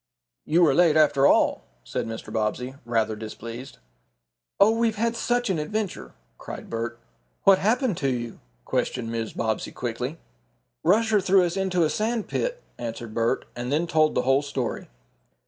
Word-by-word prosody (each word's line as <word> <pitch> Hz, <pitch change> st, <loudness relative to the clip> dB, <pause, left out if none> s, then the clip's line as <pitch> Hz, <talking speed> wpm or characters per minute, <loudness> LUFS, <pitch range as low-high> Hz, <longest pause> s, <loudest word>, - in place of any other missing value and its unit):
"You 170 Hz, +3 st, +4 dB
are 145 Hz, -, +4 dB
late 165 Hz, -1 st, +4 dB
after 145 Hz, -3 st, +5 dB
all," -, -, +3 dB, 0.2 s
said -, -, -3 dB
Mr. 115 Hz, 0 st, -7 dB
Bobbsey, 115 Hz, +4 st, -1 dB
rather 110 Hz, -2 st, 0 dB
displeased. 115 Hz, +4 st, -8 dB, 0.8 s
"Oh, 200 Hz, +2 st, +7 dB
we've 225 Hz, -1 st, +1 dB
had 230 Hz, +2 st, 0 dB
such 245 Hz, +1 st, 0 dB
an 170 Hz, -, 0 dB
adventure," 205 Hz, +6 st, -4 dB, 0.2 s
cried -, -, -8 dB
Bert. 115 Hz, +1 st, -3 dB, 0.5 s
"What 195 Hz, -1 st, +6 dB
happened 225 Hz, -, +1 dB
to 135 Hz, -, 0 dB
you?" 120 Hz, -2 st, -4 dB, 0.3 s
questioned 115 Hz, -3 st, -1 dB
Mrs. 115 Hz, -1 st, -4 dB
Bobbsey 110 Hz, -1 st, -1 dB
quickly. 125 Hz, +5 st, -4 dB, 0.7 s
"Rusher 210 Hz, +4 st, +3 dB
threw 190 Hz, 0 st, +4 dB
us 175 Hz, +1 st, -2 dB
into 190 Hz, -3 st, +1 dB
a 155 Hz, -, +2 dB
sand 225 Hz, 0 st, -1 dB
pit," -, -, -2 dB, 0.2 s
answered 115 Hz, -1 st, -5 dB
Bert, 115 Hz, +1 st, 0 dB
and 125 Hz, +2 st, -4 dB
then 155 Hz, +4 st, +2 dB
told 155 Hz, -2 st, +2 dB
the 125 Hz, -, +2 dB
whole 135 Hz, +2 st, +3 dB
story. 135 Hz, -4 st, -3 dB
150 Hz, 160 wpm, -25 LUFS, 120-195 Hz, 0.8 s, Oh